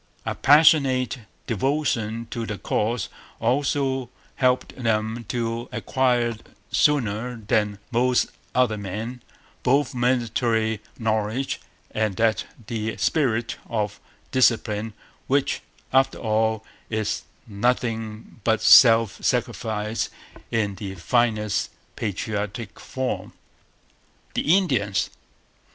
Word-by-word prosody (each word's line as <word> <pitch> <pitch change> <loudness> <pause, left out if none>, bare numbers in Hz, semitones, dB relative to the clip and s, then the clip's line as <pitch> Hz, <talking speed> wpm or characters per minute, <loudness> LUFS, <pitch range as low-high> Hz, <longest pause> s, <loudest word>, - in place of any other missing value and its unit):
A - - -1
passionate 140 -4 +5 0.3
devotion 115 -2 0
to 115 - -3
the 105 - -3
cause 110 +4 -1 0.3
also 135 +1 0 0.3
helped 130 -1 +1
them 115 -1 -1
to 115 0 -2
acquire, 120 -3 +1 0.3
sooner 125 -4 +2
than 105 -2 0
most 125 +1 +2 0.2
other 120 -4 +2
men, 110 +6 -5 0.4
both 135 0 +2
military 115 -3 +1 0.2
knowledge 110 +3 -1 0.3
and 110 -3 0
that 110 +2 +2 0.2
true 110 -1 -3
spirit 125 -3 +1
of 105 -2 -2 0.3
discipline 115 -4 +2 0.3
which, 140 +1 +1 0.3
after 135 0 +4
all, 110 -1 0 0.2
is 110 -2 -1 0.2
nothing 115 0 -2
but 110 -1 +3
self 115 -4 +7
sacrifice 110 0 -1 0.4
in 105 -3 0
its 95 -3 -5
finest 110 0 +1 0.3
patriotic 105 +1 -3
form. 130 -1 -4 1.0
The 170 +5 +4
Indians. 115 - 0
115 Hz, 95 wpm, -24 LUFS, 110-125 Hz, 1.0 s, self